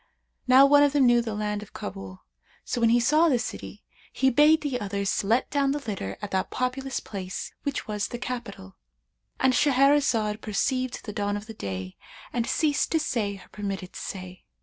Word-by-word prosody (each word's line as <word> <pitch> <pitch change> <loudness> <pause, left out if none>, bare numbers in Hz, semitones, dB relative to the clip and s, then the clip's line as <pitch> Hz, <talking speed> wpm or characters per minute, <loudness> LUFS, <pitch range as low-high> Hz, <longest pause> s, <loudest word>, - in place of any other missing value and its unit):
Now 260 +2 +8
one 290 +1 +6
of 290 -1 +4
them 285 -3 +4
knew 240 -1 +5
the 225 -2 -4
land 210 0 -2
of 210 - -12
Kabul; 95 -1 -8 0.4
so 240 - -2
when 230 - +5
he 240 +1 +4
saw 305 +7 +4
the 260 - +3
city, 235 - -6 0.3
he 265 0 +2
bade 300 +5 +5
the 275 -5 -2
others 200 0 -1
let 225 +6 +2
down 280 -1 +2
the 290 -1 -4
litter 185 - -4
at 205 - -5
that 190 0 -1
populous 260 +1 -2
place 190 -3 -6
which 285 -2 -3
was 210 -2 -2
the 240 - -6
capital."—And 95 - -5
Shahrazad 260 -6 +3
perceived 255 +4 -1
the 210 - -6
dawn 205 0 -1
of 205 - -8
day 95 - -6 0.4
and 235 -1 -1
ceased 300 -3 +1
to 320 - +3
say 215 -9 -1
her 195 - -15
permitted 195 -3 -5
say. 185 -1 -7
230 Hz, 180 wpm, -26 LUFS, 200-270 Hz, 0.4 s, Now